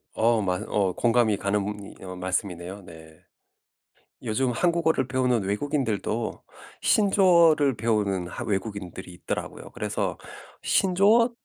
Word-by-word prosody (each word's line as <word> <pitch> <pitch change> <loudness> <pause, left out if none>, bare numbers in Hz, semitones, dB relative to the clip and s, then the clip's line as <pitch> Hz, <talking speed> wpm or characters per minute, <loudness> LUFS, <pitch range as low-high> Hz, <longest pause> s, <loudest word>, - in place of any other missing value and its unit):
어 115 0 +3
맞어 90 -1 -1
어 95 -3 +1
공감이 115 -2 +2
가는 100 0 -3
어 90 -1 -7
말씀이네요 90 +1 -4
네. 80 -2 -14 1.0
요즘 125 +4 0
한국어를 165 -1 +1
배우는 125 -4 +1
외국인들도 110 - -2 0.4
신조어를 170 - +4
배우는 105 -5 0
하 - - -6
외국인들이 95 -3 -4
있더라고요. - - -6
그래서 - - -3 0.4
신조어 200 +6 +3
110 Hz, 285 characters per minute, -25 LUFS, 95-135 Hz, 1.0 s, 신조어를